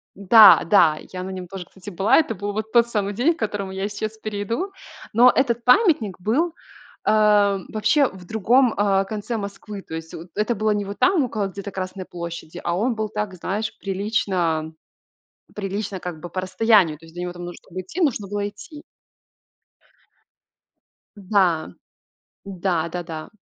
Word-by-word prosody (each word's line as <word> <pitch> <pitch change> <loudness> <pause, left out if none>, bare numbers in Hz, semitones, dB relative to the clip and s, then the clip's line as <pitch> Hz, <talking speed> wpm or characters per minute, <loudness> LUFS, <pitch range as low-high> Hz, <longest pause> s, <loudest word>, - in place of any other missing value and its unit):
Да, 205 +2 +8
да, 165 -4 +4
я 185 - -5
на 190 - -5
нём 185 -1 -6
тоже, 185 0 -7
кстати, 190 +1 -11
была. 195 +3 +3
Это 260 -8 +1
был 205 +2 -4
вот 215 +1 -4
тот 235 -1 +5
самый 205 -3 -1
день, 275 +10 +2
к - - -20
которому 205 -3 -3
я 195 +1 -3
сейчас 215 +1 -5
перейду. 215 - -3 0.4
Но 245 +3 +7
этот 240 -3 +1
памятник 250 - +3
был, 300 - 0 0.5
а, 210 -2 +4
вообще 275 +6 +2
в 190 -1 -13
другом, 230 +4 +3
а, 195 -1 +2
конце 215 +3 -4
Москвы, 200 0 -7
то 160 - -9
есть 160 0 -7
вот 170 +2 -9
это 215 +3 0
было 215 0 +1
не 205 -1 -1
вот 200 +1 -7
там, 365 -6 +3
около 215 -5 -2
где-то 200 +1 -7
Красной 185 0 -5
площади, 170 -1 -7
а 170 - 0
он 235 +6 0
был 215 -1 -2
так, 210 -2 -4
знаешь, 200 +5 -3
прилично 185 -5 -1 0.8
прилично 200 -1 -4
как 175 -3 -7
бы 175 - -7
по 185 +2 -4
расстоянию. 190 -5 +3
То 165 - -16
есть 160 - -17
до 175 - -6
него 180 0 -4
там 175 0 -9
нуж 175 0 -7
чтоб - - -20
идти, 185 - -4
нужно 225 - 0
было 205 0 -2
идти. 215 +9 -12 2.3
Да, 185 - +1 0.7
да-да-да. 170 -3 -3
200 Hz, 170 wpm, -22 LUFS, 185-220 Hz, 2.3 s, Да